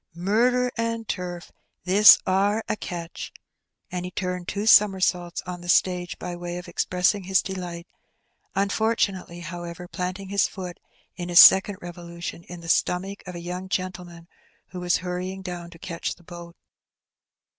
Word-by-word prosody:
Murder 245 +7 +2
and 230 -1 -2
turf! 175 -2 -5 0.3
this 195 +4 +8
are 200 +4 +1
a - - 0
catch! 175 -4 -7 0.3
*' - - -47
And 180 0 -3
he 180 - -4
turned 180 -1 -4
two 205 +2 -3
somersaults 190 -5 +4
on 180 -1 -6
the 175 - -8
stage 180 0 +2
by 175 0 -5
way 175 0 -5
of 180 - -8
expressing 180 +3 0
his 190 0 +2
delight, 175 -3 -6 0.7
unfortunately, 195 -3 0
however, 175 +1 -7
planting 185 +1 -5
his 200 -1 +2
foot 180 -3 -8 0.4
in 175 0 -5
his 175 - +7
second 190 +1 +8
revolution 170 -1 -7
in 175 -1 -9
the 165 - -10
stomach 190 +4 0
of 180 - -7
a 170 - -6
young 180 +2 -6
gentleman 180 -3 -4 0.4
who 180 - -7
was 180 0 +2
hurrying 185 +2 -4
down 175 -2 -6
to 170 - -14
catch 170 0 -4
the 175 - -22
boat. 170 0 -11
180 Hz, 155 wpm, -25 LUFS, 175-190 Hz, 0.7 s, this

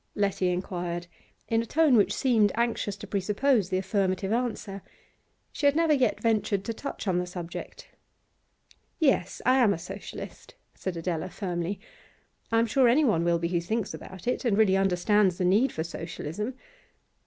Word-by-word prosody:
Letty 195 -2 +1
inquired, 175 -1 -3 0.4
in 225 0 +2
a - - -4
tone 310 -2 +4
which 200 -3 +4
seemed 220 -3 +3
anxious 230 -3 -1
to - - -9
presuppose 210 +2 +1
the 185 - 0
affirmative 190 0 0
answer. 225 -5 -2 0.7
She 285 - +1
had 285 - +3
never 325 -1 +3
yet 255 -6 +2
ventured 215 -3 +1
to 230 - -2
touch 280 -2 -6
on 180 -2 +2
the 180 - -3
subject. 175 -1 -7 1.1
'Yes, 265 - +1
I 255 +2 +5
am 215 -5 +4
a - - -6
Socialist,' 195 - -9 0.2
said 185 -3 -5
Adela 165 0 -2
firmly. 180 0 -3 0.7
'I 225 - +3
am 230 - +4
sure 250 +3 +3
anyone 235 - +3
will 170 0 +2
be 170 0 -2
who 170 -1 0
thinks 220 +4 -2
about 190 -2 -10
it, 250 - -1
and 225 -5 +2
really 210 -3 +4
understands 195 0 +2
the 180 - 0
need 215 +8 +3
for 160 - -3
Socialism. 170 - -5
200 Hz, 165 wpm, -27 LUFS, 180-230 Hz, 1.1 s, I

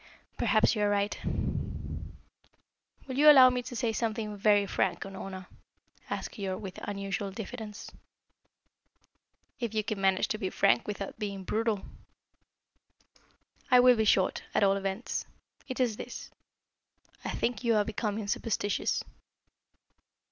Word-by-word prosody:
"Perhaps 215 -2 +3
you 210 - -1
are 205 - +3
right." 205 0 +1 1.9
"Will 260 0 -4
you 300 +1 +9
allow 260 -3 +9
me 250 0 -1
to 245 - -8
say 230 -2 0
something 220 -2 -2
very 205 0 +4
frank, 190 -1 0
Unorna?" 190 -1 -7 0.6
asked - - -3
Keyork 190 -3 -4
with 195 -4 -7
unusual 195 -1 -3
diffidence. 215 +1 -7 1.7
"If 235 -3 -3
you 215 - +1
can 210 -2 -3
manage 190 -1 +3
to 215 - -2
be 190 - -1
frank 120 -7 +2
without 205 0 -5
being 200 -3 -4
brutal." 220 0 0 1.9
"I 250 -2 +7
will 250 0 +7
be 220 -1 +1
short, 190 -2 +3
at - - +4
all 195 0 +4
events. 195 +3 -3 0.4
It 255 -1 -5
is 235 -4 +1
this. - - -8 0.9
I - - -3
think 240 -1 -1
you 230 -2 +3
are 210 -1 +3
becoming 215 -1 -3
superstitious." 205 -1 -1
210 Hz, 135 wpm, -30 LUFS, 195-230 Hz, 1.9 s, you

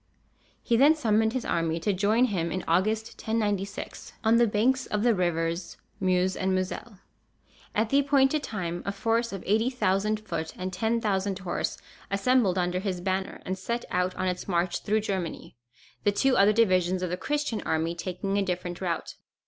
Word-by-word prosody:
He 235 - +2
then 290 +5 +6
summoned 220 -5 +2
his 255 - -2
army 165 0 0
to 205 +3 +1
join 210 +6 +3
him 175 -8 -1
in 185 +1 -2
August, 215 +6 +1
1096, 205 -3 -2
on 225 +1 +5
the 235 0 +5
banks 245 +5 +1
of 210 0 -1
the 240 -1 +4
rivers 170 -2 -1 0.2
Meuse 185 0 +2
and 190 0 0
Moselle. 185 +3 -4 0.8
At 215 +1 +1
the 275 - +4
appointed 280 +1 +3
time, 175 -8 -4
a 200 - -2
force 230 +4 0
of 195 -2 -6
80,000 215 -2 +1
foot 160 -6 -4
and 185 0 -4
10,000 205 -3 0
horse 185 -3 -3 0.3
assembled 200 -1 +2
under 180 0 0
his 190 -2 -2
banner, 190 +1 -2
and 185 - -2
set 235 +5 -3
out 180 0 0
on 185 - -1
its 180 0 -3
march 175 -1 0
through 215 +1 +1
Germany, 190 - -4 0.5
the 205 - +4
two 255 +6 +2
other 200 0 +6
divisions 185 -4 +2
of 180 - -2
the - - 0
Christian 290 +2 -2
army 160 +1 0
taking 185 +3 -3
a - - +3
different 180 -1 -3
route. 175 -3 -3
195 Hz, 175 wpm, -27 LUFS, 180-225 Hz, 0.8 s, then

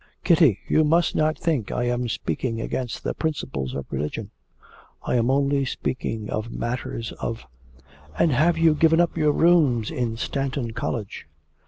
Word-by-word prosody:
Kitty, 160 - +5
you 155 - +4
must 165 +2 +3
not 155 0 +1
think 155 -10 -1
I 125 - -1
am 120 0 -1
speaking 115 0 -2
against 120 +1 -4
the - - -1
principles 70 - -3
of 70 - -4
religion; 75 +2 -4 0.7
I - - -2
am 120 0 +2
only 140 +1 +2
speaking 115 -4 -3
of 110 +2 -3
matters 115 -1 -4
of 115 - -4 0.4
' 75 +4 -23
'And 165 - +3
have 160 +6 +3
you 165 -1 +5
given 160 +1 +4
up 175 -1 +2
your 155 -2 +3
rooms 145 -9 +3
in 115 -2 -2
Stanton 135 -1 -2
College?' 115 -5 -4
125 Hz, 160 wpm, -24 LUFS, 115-155 Hz, 0.7 s, Kitty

